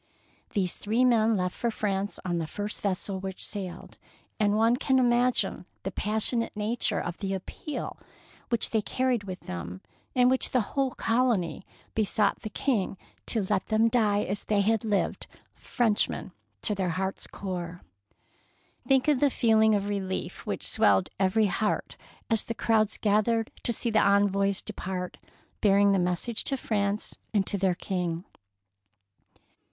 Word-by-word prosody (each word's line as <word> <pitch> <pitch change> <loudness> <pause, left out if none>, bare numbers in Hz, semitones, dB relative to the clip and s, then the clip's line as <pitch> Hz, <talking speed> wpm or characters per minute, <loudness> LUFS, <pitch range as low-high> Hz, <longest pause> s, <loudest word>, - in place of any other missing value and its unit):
These 185 -4 +1
three 225 +5 +1
men 225 -3 +4
left 180 -1 -1
for 235 - -1
France 200 -2 -2
on 175 -2 0
the 160 - -3
first 205 +5 -4
vessel 195 0 -1
which 190 0 -3
sailed, 190 -4 -5 0.4
and 205 -1 +3
one 225 +2 +4
194 245 -6 +2 0.2
THE 195 - -3
PEARL 210 +4 -2
NECKLACE 220 -1 +2
can 240 - +1
imagine - - 0
the - - -19
passionate - - -17
nature 220 +3 0
of 175 0 -4
the 195 -1 -2
appeal 235 +10 -6 0.5
which 235 - +1
they 220 - +2
carried 250 -1 0
with 185 -1 -6
them, 90 +1 -6 0.4
in 250 -1 +5
which 260 +1 +2
the 245 -5 0
whole 270 -2 0
colony 225 -9 0 0.3
be 220 - +2
sought 210 0 +1
the 215 - -5
King 210 -4 -1 0.3
to 220 -4 +1
let 195 -2 0
them 220 +1 +3
die 210 -3 +2
as 200 +2 -3
they 205 -2 +2
had 220 +2 +2
lived, 210 -3 -1 0.2
— - - -45
Frenchmen 225 -4 0 0.3
to 210 - +1
their 190 -3 -1
hearts' 190 0 -2
core. 180 -2 -5 1.0
Think 265 +1 +3
of 295 -4 +4
the 285 - +4
feeling 220 -3 +4
of 200 0 -1
relief 195 -2 -3
which - - -3
swelled 95 -2 +3
every 200 +3 +3
heart 210 +2 -1 0.3
as 225 -2 +1
the 230 - -5
crowds 220 -2 +2
gathered 220 +2 +2
to - - +1
see 235 +1 -1
the 215 - +4
envoys 200 -1 +2
depart 185 -3 -5 0.4
bearing 200 -1 +5
the 195 - +3
message 180 +6 +1
to 270 - 0
Prance 205 -3 -1 0.2
and 195 -2 +3
to - - +1
their 185 -2 +2
King! 175 -1 -3
205 Hz, 165 wpm, -28 LUFS, 190-230 Hz, 1.0 s, in